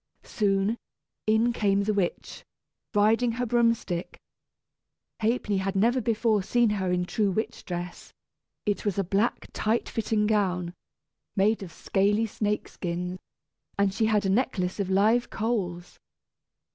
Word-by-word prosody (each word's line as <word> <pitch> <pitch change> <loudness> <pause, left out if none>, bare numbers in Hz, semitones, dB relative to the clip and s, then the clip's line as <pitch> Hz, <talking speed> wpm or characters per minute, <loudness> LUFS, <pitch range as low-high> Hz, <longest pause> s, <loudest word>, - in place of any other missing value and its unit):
Soon, 200 +1 0 0.5
in 225 +2 +3
came 200 -3 +2
the 215 +1 0
witch, 195 -4 -2 0.5
riding 225 +3 +3
her 245 +2 -1
broom 235 0 +3
stick. 175 -5 -5 1.0
Ha'penny 220 -2 0
had 195 +1 -2
never 235 +6 +3
before 220 -2 +1
seen 235 +3 +2
her 190 -3 -1
in 180 0 +1
her - - -1
true 205 +2 0
witch 220 +4 -3
dress. 175 0 -6 0.5
It 205 -2 0
was 205 -3 -1
a 195 - +2
black, 200 +6 0
tight 220 +2 0
fitting 215 -1 0
gown, 185 -5 0 0.6
made 205 +3 +2
of 185 -4 -7
scaly 205 +5 +1
snake 210 -1 -2
skin, 180 +1 -4 0.6
and 200 -1 +2
she 220 +2 +1
had 210 -2 +2
a - - +1
necklace 195 -5 0
of 195 -2 -1
live 215 +5 +3
coals. 190 -6 -3
205 Hz, 145 wpm, -27 LUFS, 190-225 Hz, 1.0 s, in